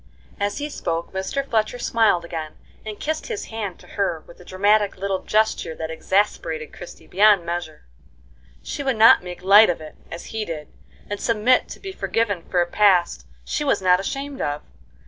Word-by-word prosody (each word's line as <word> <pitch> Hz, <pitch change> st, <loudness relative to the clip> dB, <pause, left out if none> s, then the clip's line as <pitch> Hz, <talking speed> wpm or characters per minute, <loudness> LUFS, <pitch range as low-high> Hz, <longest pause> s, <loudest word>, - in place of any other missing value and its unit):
As 205 Hz, 0 st, -1 dB
he 290 Hz, +1 st, -3 dB
spoke, 170 Hz, -, -4 dB
Mr. 190 Hz, +9 st, -3 dB
Fletcher 225 Hz, 0 st, 0 dB
smiled 220 Hz, -7 st, +2 dB
again, 160 Hz, -2 st, -6 dB, 0.3 s
and 215 Hz, -1 st, -7 dB
kissed 310 Hz, +1 st, -3 dB
his 450 Hz, -4 st, -4 dB
hand 205 Hz, -5 st, -4 dB
to -, -, -17 dB
her 175 Hz, -6 st, -2 dB
with 170 Hz, -, -16 dB
a -, -, -13 dB
dramatic 200 Hz, +3 st, +2 dB
little 195 Hz, 0 st, -1 dB
gesture 215 Hz, -7 st, 0 dB
that 160 Hz, 0 st, -5 dB
exasperated 160 Hz, -3 st, -1 dB
Christie 175 Hz, -, -11 dB
beyond 200 Hz, -2 st, +4 dB
measure. 170 Hz, -2 st, -5 dB, 0.8 s
She -, -, -5 dB
would 265 Hz, -3 st, 0 dB
not 220 Hz, +1 st, +7 dB
make 180 Hz, 0 st, -8 dB
light 205 Hz, +3 st, +7 dB
of 175 Hz, -, -1 dB
it, 155 Hz, -1 st, -11 dB, 0.2 s
as 170 Hz, -, -7 dB
he 220 Hz, -1 st, -2 dB
did, 155 Hz, -6 st, -6 dB, 0.4 s
and 205 Hz, 0 st, -5 dB
submit 230 Hz, +2 st, +2 dB
to -, -, -9 dB
be 390 Hz, -, -7 dB
forgiven 225 Hz, -, -1 dB
for 180 Hz, -2 st, +3 dB
a -, -, -7 dB
past 185 Hz, -3 st, +2 dB, 0.2 s
she 295 Hz, -, -2 dB
was 285 Hz, -, +2 dB
not 180 Hz, -1 st, +4 dB
ashamed 275 Hz, +7 st, -4 dB
of. 145 Hz, 0 st, -2 dB
200 Hz, 185 wpm, -22 LUFS, 170-220 Hz, 0.8 s, not